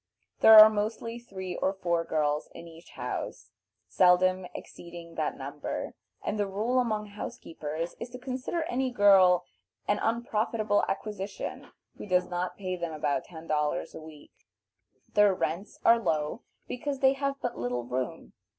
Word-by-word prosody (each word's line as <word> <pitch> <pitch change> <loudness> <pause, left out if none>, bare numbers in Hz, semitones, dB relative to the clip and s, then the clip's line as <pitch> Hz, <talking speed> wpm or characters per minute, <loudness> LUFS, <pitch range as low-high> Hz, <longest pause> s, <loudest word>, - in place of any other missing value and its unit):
There 220 0 +9
are 215 0 +13
mostly 220 +2 -3
three 190 -6 -7
or 190 - 0
four 170 -3 0
girls 150 -2 -1
in 170 - -9
each 165 +1 -14
house, - - -5 0.4
seldom 185 0 +3
exceeding 170 -1 -10
that - - -2
number, - - -5 0.3
and 210 - -2
the 205 - +1
rule 220 +6 0
among 215 -4 0
house 210 +3 -6
keepers 160 +1 -5
is 235 - -6
to 250 - -8
consider 255 +6 -3
any 265 -3 -1
girl 190 -6 +5 0.4
an 205 - +1
unprofitable 225 -2 0
acquisition 200 0 -5 0.3
who - - -7
does 180 -1 +2
not 180 +1 -3
pay 185 -2 -3
them 170 -2 -4
about 155 +2 -1
ten 165 -2 -11
dollars 150 +1 -1
a - - -8
week. 155 -2 -13 0.8
Their 210 -3 +5
rents 170 +4 -3
are 230 0 +7
low, 155 -1 -1 0.3
because 275 +2 -4
they 265 0 +5
have 275 0 -2
but 245 - -4
little 125 0 -2
room. 130 +7 -4
190 Hz, 155 wpm, -28 LUFS, 165-225 Hz, 0.8 s, are